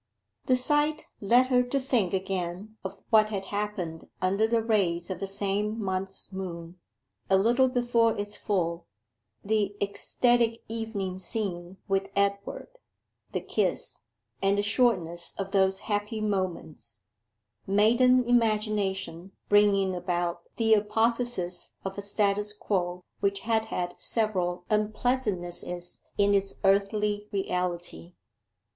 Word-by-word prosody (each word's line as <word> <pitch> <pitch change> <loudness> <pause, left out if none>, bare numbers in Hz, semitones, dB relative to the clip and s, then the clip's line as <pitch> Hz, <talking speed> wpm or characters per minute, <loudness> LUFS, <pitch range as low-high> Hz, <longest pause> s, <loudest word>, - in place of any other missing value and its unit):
The 255 - +5
sight 295 +4 +1
led 240 +5 +4
her 250 -1 +5
to 250 +3 0
think 245 -9 +1
again 190 +2 -3
of 190 - -6
what 215 -1 +6
had 195 -2 -3
happened 200 -6 -3
under 195 +4 +2
the 230 0 +1
rays 190 -6 +1
of 185 - -4
the 195 - -3
same 205 +2 -1
month's 190 -1 -4
moon, 175 -2 -6 0.5
a 190 - +5
little 240 +6 +4
before 240 -3 +2
its 205 0 -3
full, 170 -4 -1 0.6
the 205 -1 +1
ecstatic 230 +3 +1
evening 215 -5 -4
scene 185 -2 -3
with 195 0 0
Edward: 200 - -1 0.5
the - - -2
kiss, - - -1 0.4
and 195 +1 +3
the 205 - +1
shortness 200 -7 +1
of 195 -1 -4
those 190 -1 +2
happy 210 +1 -2
moments 185 - -3 0.7
maiden 240 +6 +5
imagination 210 -6 0 0.2
bringing 200 -2 +4
about 175 -1 -2
the 225 -1 +3
apotheosis 215 -3 0
of 195 0 -3
a 200 - -4
status 205 0 0
quo 180 -4 -2 0.2
which 200 0 0
had 220 0 +1
had 175 -3 -4
several 180 -6 0
unpleasantnesses 210 -5 -1 0.2
in 205 0 +4
its 195 0 0
earthly 205 +1 +2
reality. 180 -3 -2
200 Hz, 120 wpm, -28 LUFS, 185-220 Hz, 0.7 s, what